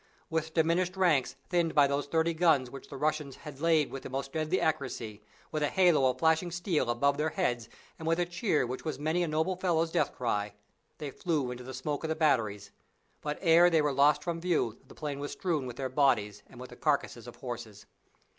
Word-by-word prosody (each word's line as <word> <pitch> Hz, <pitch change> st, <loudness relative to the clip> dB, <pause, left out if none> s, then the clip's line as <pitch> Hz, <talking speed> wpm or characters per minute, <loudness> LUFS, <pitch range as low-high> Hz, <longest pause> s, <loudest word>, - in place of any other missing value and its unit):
With 160 Hz, 0 st, -2 dB
diminished 175 Hz, +3 st, +1 dB
ranks 150 Hz, -9 st, +2 dB
thinned 170 Hz, -2 st, +1 dB
by 145 Hz, -2 st, +7 dB
those 140 Hz, 0 st, -1 dB
thirty 165 Hz, +2 st, +1 dB
guns 160 Hz, -7 st, +3 dB
which 135 Hz, -, -10 dB
the 140 Hz, -, -8 dB
Russians 150 Hz, -1 st, -1 dB
had 150 Hz, -3 st, -11 dB
laid 160 Hz, -3 st, +3 dB
with 135 Hz, -, -6 dB
the -, -, -8 dB
most 135 Hz, +1 st, -4 dB
deadly 160 Hz, +3 st, 0 dB
accuracy, 135 Hz, -10 st, -2 dB, 0.3 s
with 155 Hz, -, -2 dB
a 150 Hz, -, +3 dB
halo 170 Hz, -8 st, +4 dB
of 125 Hz, -, -2 dB
flashing 160 Hz, +2 st, +2 dB
steel 170 Hz, -6 st, -1 dB
above 140 Hz, +4 st, +2 dB
their 155 Hz, +2 st, +1 dB
heads, 120 Hz, -10 st, -1 dB, 0.3 s
and 160 Hz, -, -6 dB
with 165 Hz, 0 st, +2 dB
a 175 Hz, -, +2 dB
cheer 175 Hz, -, 0 dB
which 125 Hz, +2 st, -5 dB
was 155 Hz, -4 st, -3 dB
many 155 Hz, +5 st, 0 dB
a 175 Hz, -, +1 dB
noble 160 Hz, +4 st, 0 dB
fellow's 170 Hz, -3 st, 0 dB
death -, -, +1 dB
cry, 105 Hz, -4 st, -2 dB, 0.4 s
they 150 Hz, -3 st, -5 dB
flew 150 Hz, -7 st, -1 dB
into 125 Hz, 0 st, -7 dB
the 130 Hz, -, -8 dB
smoke 140 Hz, +4 st, -3 dB
of -, -, -1 dB
the 160 Hz, -, -1 dB
batteries, 115 Hz, -11 st, +1 dB, 0.5 s
but 150 Hz, 0 st, -3 dB
ere 170 Hz, 0 st, +6 dB
they 165 Hz, -2 st, +3 dB
were 145 Hz, -1 st, +1 dB
lost 140 Hz, +2 st, +4 dB
from 170 Hz, -1 st, -3 dB
view 160 Hz, -11 st, 0 dB
the -, -, -14 dB
plain 145 Hz, -3 st, -4 dB
was 145 Hz, 0 st, -4 dB
strewn 160 Hz, -8 st, -1 dB
with 120 Hz, -, -7 dB
their 130 Hz, +1 st, -3 dB
bodies 130 Hz, -7 st, +1 dB
and 120 Hz, -, -14 dB
with 125 Hz, -, -9 dB
the -, -, -10 dB
carcasses 140 Hz, -6 st, -1 dB
of 120 Hz, -, -9 dB
horses. 120 Hz, -5 st, -7 dB
150 Hz, 220 wpm, -30 LUFS, 130-165 Hz, 0.5 s, by